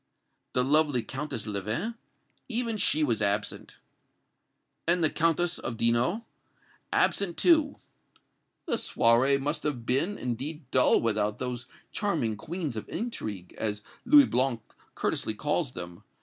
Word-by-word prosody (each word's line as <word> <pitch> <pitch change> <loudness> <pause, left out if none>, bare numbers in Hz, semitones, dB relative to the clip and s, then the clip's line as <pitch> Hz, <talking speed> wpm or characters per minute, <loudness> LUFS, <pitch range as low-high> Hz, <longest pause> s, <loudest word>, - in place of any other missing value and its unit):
"The 125 - +3
lovely 145 -3 +3
Countess 135 -4 -5
Leven 110 - -2 0.3
" - - -43
"Even 230 -2 -1
she 155 -5 +3
was 115 -7 +1
absent." 100 0 -1 1.1
"And 175 0 +3
the 155 - +3
Countess 165 +1 +1
of 115 - -4
Dino?" 120 - +2 0.7
"Absent, 185 -4 +1
too." 315 -4 +4 0.9
"The - - 0
soirée 125 +4 +3
must 145 +3 -2
have 130 -6 -3
been, 150 +12 +1
indeed, 135 +6 -4
dull 130 - +5
without 105 -2 0
those 125 0 -4 0.2
'charming 165 - -1
queens 155 - -4
of 110 - -6
intrigue,' 110 - -5
as 105 -1 -2 0.2
Louis 290 -1 +7
Blanc 125 -2 +1 0.3
courteously 110 - -1
calls 150 +2 0
them. 85 +2 -7
135 Hz, 130 wpm, -28 LUFS, 115-170 Hz, 1.1 s, Louis